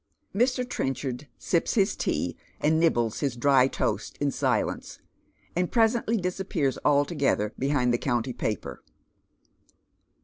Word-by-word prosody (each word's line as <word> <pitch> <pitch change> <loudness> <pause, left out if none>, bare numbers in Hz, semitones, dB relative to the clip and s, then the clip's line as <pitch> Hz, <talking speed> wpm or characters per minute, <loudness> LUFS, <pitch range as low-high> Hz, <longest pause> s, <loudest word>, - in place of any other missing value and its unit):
Mr. 250 +3 +1
Trenchard 135 - -3
sips 170 - 0
his 200 -2 +2
tea - - -1 0.2
and 160 +2 +2
nibbles 120 -9 +2
his 140 -4 -1
dry 130 +1 +4
toast - - -2
in - - +1
silence, - - -1 0.6
and 180 0 0
presently 230 0 +2
disappears 180 -7 -1
altogetlier 140 -7 +2
behind 130 -3 +1
the 120 - +1
county 120 -1 -1
paper. 105 -4 -4
145 Hz, 115 wpm, -27 LUFS, 125-185 Hz, 0.6 s, dry